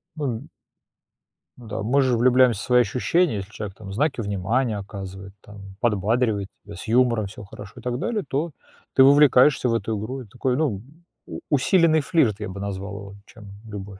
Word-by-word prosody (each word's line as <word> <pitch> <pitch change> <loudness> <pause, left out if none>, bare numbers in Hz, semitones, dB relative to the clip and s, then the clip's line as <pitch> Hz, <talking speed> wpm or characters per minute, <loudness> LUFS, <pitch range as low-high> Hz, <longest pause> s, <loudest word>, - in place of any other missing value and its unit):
Ну 150 -2 -3
м 115 -3 -5 1.1
Ну 120 -2 -13
да, 100 - -4
мы 135 +6 +2
же 130 -3 +2
влюбляемся 125 -3 +4
в - - -5
свои 125 -1 +5
ощущения, 150 +4 +1
если 100 +2 -7
человек 105 -3 -7
там 95 -2 -9
знаки 140 +1 0
внимания 105 +4 -1
оказывает, 95 -1 -8
там 100 -2 -12
подбадривает 110 -1 +1 0.2
тебя, 100 0 -10
с 125 - -9
юмором 115 -3 +2
всё 105 +2 -10
хорошо 100 0 -11
и - - -12
так 125 +1 -2
далее, 225 -3 -2
то 150 +6 -2 0.4
ты 130 - +6
вовлекаешься 140 -2 +5
в - - +1
эту 110 -1 -2
игру. 130 +5 -5
И 120 - -12
такой, 125 +4 -2
ну, 120 -11 -1 0.5
у - - -7
усиленный 160 +3 +4
флирт, 125 - +1
я 105 -3 -5
бы 100 +1 -7
назвал 100 0 -5
его, 100 -1 -10
чем 105 -3 -13 0.2
любовь. 100 -1 -8
115 Hz, 190 wpm, -23 LUFS, 100-130 Hz, 1.1 s, ты